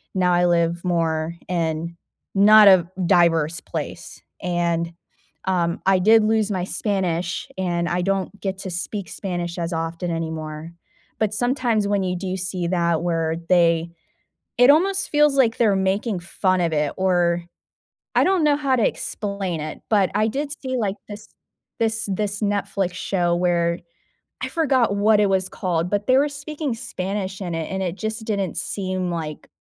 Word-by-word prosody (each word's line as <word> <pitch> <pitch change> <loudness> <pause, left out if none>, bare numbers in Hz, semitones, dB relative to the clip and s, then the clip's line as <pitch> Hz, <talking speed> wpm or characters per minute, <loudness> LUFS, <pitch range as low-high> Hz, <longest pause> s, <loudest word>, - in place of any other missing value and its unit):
now 180 -1 +2
I 175 0 +3
live 170 0 +1
more 165 -2 0
in 170 -1 -2 0.4
not 210 +1 +7
a 185 -4 +6 0.2
diverse 165 -2 +3
place, - - -6 0.2
and, 170 -1 -1 0.5
um, 175 -3 0
I 190 -1 +4
did 220 +3 +5
lose 215 -1 +1
my 185 -3 -1
Spanish, 180 -3 -2
and 175 -2 -1
I 175 +1 0
don't 195 +2 -1
get 190 -1 -3
to 190 - -5
speak 185 +2 -4
Spanish 175 -3 -4
as 170 0 -3
often 165 +2 -3
anymore. 160 -1 -5 0.5
But 215 -1 +1
sometimes 240 -3 +1
when 200 -1 +1
you 180 -1 -1
do 185 +1 -3
see 185 -1 -2
that, 170 -2 +1
where 165 -2 0
they 170 -2 +3 0.7
it 245 +2 +6
almost 375 +6 +3
feels 295 -2 +3
like 235 -4 +3
they're 215 -4 +3
making 195 +2 0
fun 185 +1 0
of 170 -1 +1
it, 150 -1 0
or 175 -2 +2 0.7
I - - +5
don't 370 -4 +2
know 295 -1 +4
how 275 -3 +1
to 230 - +3
explain 200 -5 -3
it, 155 0 -6
but 200 -4 +3
I 215 +1 +2
did 280 +6 -3
see 260 -1 -2
like 205 -4 -1
this 210 +1 -9 0.5
this 225 -1 0
this 205 +2 -2
Netflix 200 -3 -1
show 175 -3 0
where 170 -1 +1 0.6
I - - -1
forgot 260 -10 +1
what 210 +1 +4
it 205 - +3
was 190 -1 +1
called, 175 -1 -2
but 205 0 -1
they 260 +1 +5
were 290 - +3
speaking 290 0 -4
Spanish 190 -2 -4
in 175 -2 -3
it, 165 -1 -4
and 190 0 -2
it 180 -1 -3
just 220 +1 -4
didn't 200 -6 -2
seem, 185 +1 -2
like, 160 -3 -5
185 Hz, 165 wpm, -22 LUFS, 170-210 Hz, 0.7 s, not